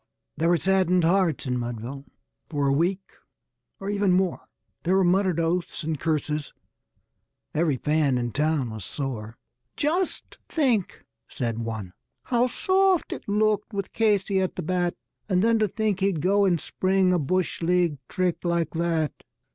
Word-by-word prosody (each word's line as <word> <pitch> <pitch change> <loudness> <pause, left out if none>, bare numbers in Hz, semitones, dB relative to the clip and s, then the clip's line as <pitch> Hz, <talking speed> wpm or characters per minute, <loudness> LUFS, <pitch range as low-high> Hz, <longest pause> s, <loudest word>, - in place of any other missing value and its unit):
_ - - -48 0.3
There 165 +2 +1
were 175 - +4
saddened 185 0 +2
hearts 175 -2 +2
in 125 -1 -1
Mudville 120 +3 -5 0.4
for 145 -1 0
a 135 - +3
week 180 +6 0 0.7
or 195 - -6
even 200 -2 +2
more; 185 -1 0 0.3
There 185 +3 +1
were 195 - +4
muttered 185 -1 +2
oaths 170 +1 -1
and 155 -2 -2
curses 150 -1 -1 1.0
every 155 -3 +1
fan 150 -2 +1
in 120 -1 -2
town 150 -4 0
was 110 -3 -7
sore. 115 -5 -5 0.4
"Just 335 +5 -1
think," 250 - 0 0.2
said 115 -3 -3
one, 110 -5 -5 0.3
"how 245 0 +2
soft 375 +6 +2
it - - -9
looked 210 +1 +1
with 200 -1 -4
Casey 200 -3 +2
at 185 - -2
the 180 - -4
bat! 175 +1 0 0.3
And 185 0 +2
then 230 0 +3
to 215 - +3
think 210 -1 -1
he'd 195 -4 +1
go 200 +5 +3
and 175 -3 +2
spring 185 +1 +1
a 180 - +2
bush 180 +6 -1
league 170 -3 +2
trick 180 -2 -1
like 170 -2 0
that." 165 -2 0
175 Hz, 160 wpm, -25 LUFS, 150-195 Hz, 1.0 s, were